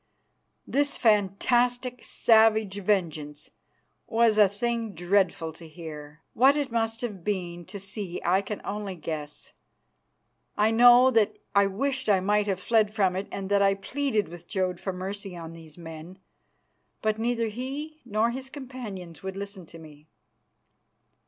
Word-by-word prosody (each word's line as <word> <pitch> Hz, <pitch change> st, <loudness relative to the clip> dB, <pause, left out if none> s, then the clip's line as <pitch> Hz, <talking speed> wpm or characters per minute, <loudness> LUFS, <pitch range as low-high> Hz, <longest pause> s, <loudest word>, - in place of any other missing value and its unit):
This 285 Hz, +1 st, +1 dB
fantastic, 240 Hz, +4 st, +2 dB
savage 220 Hz, -3 st, +3 dB
vengeance 155 Hz, -7 st, -1 dB, 0.6 s
was 225 Hz, -2 st, +3 dB
a 205 Hz, -2 st, +7 dB
thing 230 Hz, +1 st, -2 dB
dreadful 175 Hz, -2 st, +1 dB
to 165 Hz, +1 st, -12 dB
hear; 155 Hz, -1 st, -10 dB
what 270 Hz, +5 st, +5 dB
it 285 Hz, -4 st, -2 dB
must 225 Hz, -1 st, -1 dB
have 205 Hz, -8 st, -5 dB
been 175 Hz, -4 st, -3 dB
to 200 Hz, -, -8 dB
see 195 Hz, -2 st, -5 dB
I 185 Hz, +3 st, +3 dB
can 205 Hz, +1 st, -6 dB
only 205 Hz, -2 st, -4 dB
guess. 150 Hz, -3 st, -7 dB, 1.0 s
I 215 Hz, +1 st, +3 dB
know 245 Hz, +2 st, +7 dB
that 225 Hz, -4 st, +2 dB, 0.2 s
I 200 Hz, 0 st, +5 dB
wished 260 Hz, +5 st, -2 dB
I 195 Hz, -2 st, +5 dB
might 205 Hz, +2 st, +1 dB
have 190 Hz, -2 st, -1 dB
fled 215 Hz, +1 st, +2 dB
from 195 Hz, -4 st, +1 dB
it 190 Hz, +2 st, -3 dB
and 195 Hz, -1 st, -4 dB
that 200 Hz, 0 st, +4 dB
I 195 Hz, 0 st, +4 dB
pleaded 220 Hz, +1 st, -1 dB
with 170 Hz, +1 st, -11 dB
Jodd 185 Hz, -3 st, -1 dB
for 190 Hz, -, -3 dB
mercy 190 Hz, 0 st, -6 dB
on 165 Hz, -1 st, -8 dB
these 160 Hz, -1 st, -12 dB
men. 165 Hz, +2 st, -10 dB, 0.9 s
But 215 Hz, 0 st, +1 dB
neither 230 Hz, 0 st, 0 dB
he 280 Hz, +7 st, -6 dB
nor 215 Hz, +3 st, +1 dB
his 260 Hz, +2 st, -6 dB
companions 235 Hz, -, -8 dB
would 190 Hz, 0 st, -5 dB
listen 200 Hz, -3 st, -7 dB
to 165 Hz, -, -12 dB
me. 155 Hz, -1 st, -14 dB
200 Hz, 150 wpm, -27 LUFS, 180-230 Hz, 1.0 s, a